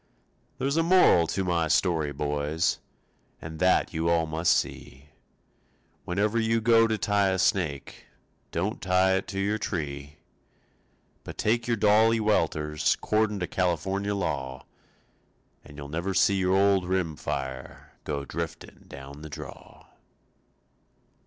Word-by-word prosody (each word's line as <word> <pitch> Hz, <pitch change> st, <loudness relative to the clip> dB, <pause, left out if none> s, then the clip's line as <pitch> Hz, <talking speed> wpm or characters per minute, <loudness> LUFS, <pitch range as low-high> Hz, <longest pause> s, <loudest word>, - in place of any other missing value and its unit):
There's 140 Hz, +3 st, -1 dB
a -, -, +4 dB
moral 165 Hz, -, +5 dB
to 95 Hz, -, -2 dB
my 85 Hz, -3 st, 0 dB
story, 80 Hz, -2 st, +1 dB
boys, 75 Hz, +3 st, -1 dB, 0.6 s
And 80 Hz, 0 st, -8 dB
that 90 Hz, 0 st, +2 dB
you 80 Hz, +1 st, 0 dB
all 85 Hz, -1 st, +2 dB
must 80 Hz, +2 st, +2 dB
see. 70 Hz, +4 st, -6 dB, 1.0 s
Whenever 105 Hz, +5 st, 0 dB
you 115 Hz, 0 st, +1 dB
go 115 Hz, 0 st, +4 dB
to 110 Hz, -1 st, -1 dB
tie 100 Hz, 0 st, +1 dB
a 95 Hz, -, 0 dB
snake, 85 Hz, -9 st, -1 dB, 0.4 s
Don't 95 Hz, +7 st, -3 dB
tie 95 Hz, 0 st, +3 dB
it 95 Hz, -, -4 dB
to 95 Hz, -, -4 dB
your 105 Hz, +2 st, 0 dB
tree; 75 Hz, -6 st, -5 dB, 1.1 s
But -, -, -9 dB
take 115 Hz, +2 st, 0 dB
your 120 Hz, -1 st, +1 dB
dolly 110 Hz, +2 st, +4 dB
welters 75 Hz, -7 st, +1 dB
'Cordin' 105 Hz, -1 st, 0 dB
to -, -, 0 dB
California 95 Hz, +3 st, -1 dB
law, 65 Hz, -9 st, -3 dB, 1.0 s
And 70 Hz, +1 st, -14 dB
you'll 70 Hz, -1 st, -7 dB
never 85 Hz, +6 st, -3 dB
see 100 Hz, +1 st, +4 dB
your 95 Hz, 0 st, +2 dB
old 100 Hz, -2 st, +3 dB
rim 90 Hz, -4 st, -1 dB
fire 65 Hz, -2 st, -6 dB
Go 70 Hz, -2 st, -4 dB
drifting 85 Hz, +1 st, -7 dB
down 70 Hz, +2 st, -10 dB
the 80 Hz, -, -8 dB
draw. 75 Hz, -, -11 dB
90 Hz, 135 wpm, -27 LUFS, 75-100 Hz, 1.1 s, moral